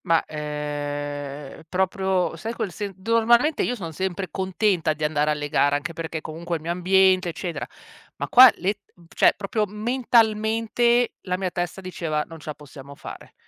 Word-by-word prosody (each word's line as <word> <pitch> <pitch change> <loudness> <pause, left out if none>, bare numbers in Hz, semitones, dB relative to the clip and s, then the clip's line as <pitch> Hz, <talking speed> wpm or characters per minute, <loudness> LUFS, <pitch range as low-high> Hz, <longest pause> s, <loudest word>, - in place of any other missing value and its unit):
Ma, 165 -2 +3
ehm, 145 -1 -5
proprio 190 -1 0
sai 220 +8 -5
quel 205 - -3
sen 205 +1 -5
d 190 +3 -16
normalmente 235 +6 +4
io 245 - 0
sono 170 -8 -6
sempre 190 +3 -3
contenta 190 -3 0
di 155 0 -7
andare 150 0 +1
alle 150 -1 -1
gare, 145 0 +2
anche 165 +4 -3
perché 160 -1 -5
comunque 170 +3 -5
è - - 0
il 155 - -15
mio 170 - -2
ambiente 185 +1 +3
eccetera, 165 -2 -5 0.5
ma - - -4
qua 255 +1 +9
le 195 +3 0
t - - -38 0.4
cioè - - +5
proprio 210 +2 -1
mentalmente 225 +1 +2
la 180 -1 -2
mia 185 -1 -2
testa 175 +2 -3
diceva: 165 -5 -2
"Non 165 -1 -11
ce 155 - -15
la 150 - -4
possiamo 140 -1 -12
fare". - - -10
180 Hz, 180 wpm, -24 LUFS, 150-210 Hz, 0.5 s, qua